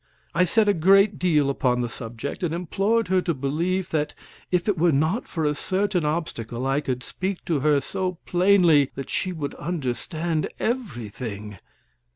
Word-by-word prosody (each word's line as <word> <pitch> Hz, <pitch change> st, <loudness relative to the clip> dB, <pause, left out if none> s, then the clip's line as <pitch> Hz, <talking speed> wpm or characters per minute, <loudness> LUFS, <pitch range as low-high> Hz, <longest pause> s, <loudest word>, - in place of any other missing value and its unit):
I 180 Hz, +1 st, +4 dB
said 215 Hz, +4 st, +3 dB
a 205 Hz, -, +5 dB
great 195 Hz, +4 st, +4 dB
deal 155 Hz, -6 st, +3 dB
upon 125 Hz, -3 st, +1 dB
the 120 Hz, -, -1 dB
subject, 115 Hz, +3 st, -6 dB
and 170 Hz, -2 st, -1 dB
implored 200 Hz, +6 st, 0 dB
her 185 Hz, 0 st, +3 dB
to 170 Hz, -3 st, -1 dB
believe 170 Hz, +7 st, -1 dB
that 150 Hz, -2 st, -1 dB, 0.3 s
if 180 Hz, +1 st, 0 dB
it 205 Hz, -, +3 dB
were 170 Hz, 0 st, +3 dB
not 155 Hz, -, +1 dB
for 160 Hz, -3 st, -2 dB
a 150 Hz, -, +2 dB
certain 190 Hz, +3 st, 0 dB
obstacle 130 Hz, -6 st, -3 dB
I 135 Hz, +2 st, +1 dB
could 125 Hz, -3 st, -3 dB
speak 190 Hz, +5 st, -4 dB
to 160 Hz, -4 st, +1 dB
her 145 Hz, +1 st, +3 dB
so 185 Hz, +4 st, -2 dB
plainly 175 Hz, -6 st, +4 dB
that 135 Hz, -, -6 dB
she 185 Hz, -, -1 dB
would 155 Hz, -5 st, -4 dB
understand 155 Hz, +1 st, -2 dB
everything. 115 Hz, -, -4 dB
160 Hz, 170 wpm, -24 LUFS, 135-185 Hz, 0.3 s, a